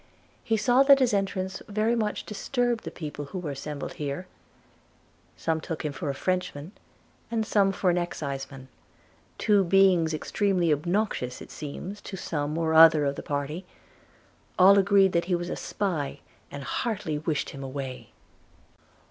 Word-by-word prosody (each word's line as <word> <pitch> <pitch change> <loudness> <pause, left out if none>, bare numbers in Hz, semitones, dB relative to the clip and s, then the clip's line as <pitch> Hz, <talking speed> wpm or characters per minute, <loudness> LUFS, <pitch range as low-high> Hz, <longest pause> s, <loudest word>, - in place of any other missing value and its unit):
He 225 - +1
saw 245 +5 +4
that 275 0 +7
his 255 -4 +2
entrance 190 -1 -1
very 215 +3 +1
much 215 -2 -2
disturbed 240 +2 -1
the - - -3
people 150 -2 -6
who 140 - -7
were 170 -5 -4
assembled 140 +1 -6
here. 145 +4 -4 1.1
Some 160 -1 -1
took 160 -1 -5
him 150 - -2
for 140 +1 -4
a 140 - -2
Frenchman, 180 -2 -2 0.6
and 225 -2 -1
some 200 -2 +3
for 185 -1 +1
an 175 - +1
Exciseman; 135 -5 -5 0.7
two 205 -2 +3
beings 185 -3 +4
extremely 175 +1 +1
obnoxious, 170 - -1
it - - -11
seems, 180 +7 -7
to 190 - -7
some 150 -2 -3
or 160 -1 0
other 160 -2 +8
of 140 0 0
the - - -6
party. 145 +5 -3 0.9
All 195 +2 +7
agreed 195 -1 +4
that 170 -1 +1
he 180 0 +1
was 175 0 -3
a - - -2
spy, 170 -9 -3 0.3
and 140 -1 -7
heartily 165 - -2
wished 155 -1 -2
him 140 - -9
away. 135 -1 -6
175 Hz, 155 wpm, -27 LUFS, 145-200 Hz, 1.1 s, other